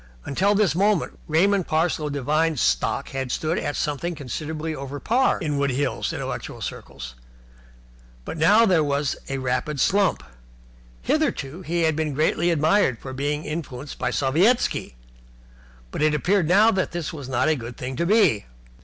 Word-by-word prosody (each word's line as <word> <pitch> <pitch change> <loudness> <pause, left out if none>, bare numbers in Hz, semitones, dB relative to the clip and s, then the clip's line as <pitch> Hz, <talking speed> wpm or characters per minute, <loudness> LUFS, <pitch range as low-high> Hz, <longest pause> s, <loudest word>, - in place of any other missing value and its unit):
Until 195 +8 +1
this 200 -5 +3
moment 200 0 +1
Raymond 185 +4 +2
Parsloe 155 -1 0
Devine's 150 +2 0
stock 65 - 0
had 135 -2 -4
stood 160 +4 -1
at 145 - -3
something 160 +4 -2
considerably 155 +3 -4
over 140 0 -6
par 250 - +2
in 150 -5 -2
Wood 140 0 +1
Hills 135 +2 -1
intellectual - - -5
circles, - - -7 1.1
but - - -5
now 205 +9 +5
there 180 -7 +3
was 145 -1 0
a 135 - -2
rapid 130 +3 -2
slump. 195 +6 +2 0.8
Hitherto 135 - -1
he 170 0 -1
had 160 -1 +2
been 155 -2 -2
greatly 160 +3 +1
admired 160 - +2
for 130 +3 -8
being 145 +3 -2
influenced 145 -3 -6
by - - 0
Sovietski, 160 - +1 1.0
but - - -4
it 155 0 +3
appeared 175 +3 +1
now 205 +6 +5
that 190 -2 -1
this 170 -2 -4
was 140 -4 -7
not 125 +3 +1
a 155 - +3
good 120 -2 -8
thing 130 +1 -5
to 170 - 0
be. 195 - +3
155 Hz, 160 wpm, -23 LUFS, 140-175 Hz, 1.1 s, now